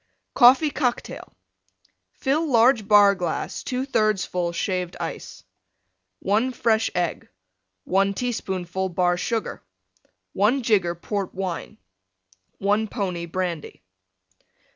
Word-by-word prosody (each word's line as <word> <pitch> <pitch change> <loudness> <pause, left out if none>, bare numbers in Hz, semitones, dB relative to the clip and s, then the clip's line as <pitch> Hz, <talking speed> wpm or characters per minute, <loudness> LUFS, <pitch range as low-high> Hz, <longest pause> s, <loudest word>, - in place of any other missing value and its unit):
COFFEE 265 +4 +6
COCKTAIL 250 -4 -3 0.8
Fill 300 +4 0
large 235 -4 +4
Bar 205 -1 +7
glass 180 -4 -3
2/3 225 -6 0
full 175 -1 -2
Shaved 180 0 -3
Ice. - - -6 0.8
1 220 +6 +1
fresh 225 -2 +1
Egg. 175 -2 -2 0.5
1 195 +1 +1
teaspoonful 190 -6 -3
Bar 175 0 +1
Sugar. 225 +5 -3 0.7
1 235 +7 +2
jigger 190 -7 +2
Port 195 +2 -4
Wine. 185 -3 -5 0.8
1 205 +3 +1
pony 180 -6 -3
Brandy. 170 - -4
200 Hz, 100 wpm, -24 LUFS, 180-235 Hz, 0.8 s, Bar